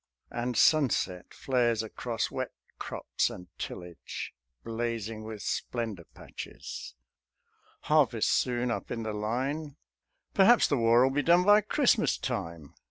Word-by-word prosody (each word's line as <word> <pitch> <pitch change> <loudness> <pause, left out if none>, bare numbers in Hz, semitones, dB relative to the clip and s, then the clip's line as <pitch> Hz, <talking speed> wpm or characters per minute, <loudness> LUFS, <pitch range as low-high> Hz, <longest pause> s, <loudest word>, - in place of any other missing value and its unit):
And 120 0 -2
sunset 125 - +2
flares 120 -4 +1
across 115 +1 -3
wet - - -4 0.3
crops - - -1
and 90 0 -10
tillage, 90 -1 -6 0.3
Blazing 115 -1 -3
with 110 -2 -7
splendour 110 -8 -3
patches. - - -8 0.9
Harvest - - +3
soon 125 -1 +1
Up - - -4
in 115 -1 -3
the 110 -1 -3
Line. 135 +8 -2 0.6
"Perhaps 225 +5 +6
the 145 - +2
War 115 +1 +5
'll 135 - +1
be 145 - +2
done 175 +3 +5
_By 205 +2 +5
Christmas 250 -5 +3
time. 85 - -5
120 Hz, 125 wpm, -29 LUFS, 110-140 Hz, 0.9 s, Perhaps